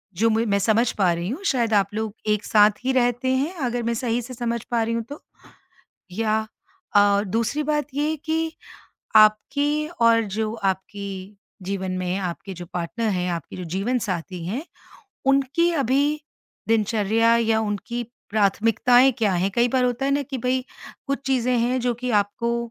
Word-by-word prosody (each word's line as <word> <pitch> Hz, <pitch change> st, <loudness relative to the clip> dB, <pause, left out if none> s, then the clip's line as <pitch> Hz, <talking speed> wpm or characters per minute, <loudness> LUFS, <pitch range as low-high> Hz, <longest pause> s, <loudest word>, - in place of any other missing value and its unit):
जो 225 Hz, +5 st, +3 dB
म 225 Hz, +1 st, +1 dB
मैं 200 Hz, 0 st, +2 dB
समझ 225 Hz, +3 st, +2 dB
पा 185 Hz, -4 st, +3 dB
रही 170 Hz, +2 st, -3 dB
हूँ, 300 Hz, -, -5 dB
शायद 235 Hz, -, +1 dB
आप 200 Hz, 0 st, +2 dB
लोग 220 Hz, -1 st, -3 dB
एक 210 Hz, 0 st, +1 dB
साथ 210 Hz, -1 st, +4 dB
ही 265 Hz, -, +1 dB
रहते 245 Hz, 0 st, +1 dB
हैं, 290 Hz, +7 st, -1 dB
अगर 240 Hz, 0 st, -2 dB
मैं 235 Hz, 0 st, 0 dB
सही 235 Hz, 0 st, -1 dB
से 255 Hz, +2 st, -9 dB
समझ 235 Hz, -1 st, -3 dB
पा 235 Hz, -1 st, +2 dB
रही 230 Hz, +1 st, -1 dB
हूँ 230 Hz, 0 st, -1 dB
तो। 290 Hz, -, -8 dB, 0.9 s
या 220 Hz, +2 st, 0 dB, 0.6 s
अ, 205 Hz, 0 st, +5 dB
दूसरी 225 Hz, +8 st, -1 dB
बात 295 Hz, -1 st, 0 dB
ये 295 Hz, +2 st, 0 dB
है 315 Hz, -, -1 dB
कि 320 Hz, 0 st, -1 dB, 0.6 s
आपकी 285 Hz, +8 st, +3 dB
और 230 Hz, 0 st, +5 dB
जो 215 Hz, +1 st, -2 dB
आपकी 195 Hz, -1 st, -4 dB, 0.3 s
जीवन 190 Hz, 0 st, -3 dB
में 180 Hz, 0 st, -2 dB
आपके 185 Hz, +1 st, -5 dB
जो 175 Hz, 0 st, -8 dB
पार्टनर 215 Hz, +6 st, -2 dB
हैं, 180 Hz, -1 st, -1 dB
आपकी 165 Hz, -3 st, -6 dB
जो 180 Hz, -, -6 dB
जीवनसाथी 190 Hz, -2 st, -2 dB
हैं, 240 Hz, -, -3 dB, 0.6 s
उनकी 275 Hz, +5 st, +3 dB
अभी 285 Hz, +2 st, +1 dB, 0.5 s
दिनचर्या 225 Hz, +1 st, +2 dB
या 225 Hz, -1 st, +2 dB
उनकी 220 Hz, +3 st, -3 dB, 0.3 s
प्राथमिकताएँ 230 Hz, +5 st, +4 dB
क्या 210 Hz, -4 st, +2 dB
हैं? 185 Hz, +2 st, +1 dB
कई 240 Hz, +1 st, +3 dB
बार 255 Hz, 0 st, +1 dB
होता 245 Hz, +2 st, -1 dB
है 275 Hz, -, +1 dB
ना 285 Hz, -, +1 dB
कि 270 Hz, -1 st, -5 dB
भई, 255 Hz, +1 st, 0 dB, 0.4 s
कुछ 275 Hz, 0 st, -1 dB
चीज़ें 255 Hz, -2 st, +1 dB
हैं 245 Hz, +2 st, +1 dB
जो 245 Hz, 0 st, 0 dB
कि 250 Hz, +2 st, -4 dB
आपको 220 Hz, +3 st, 0 dB
230 Hz, 175 wpm, -23 LUFS, 205-255 Hz, 0.9 s, अ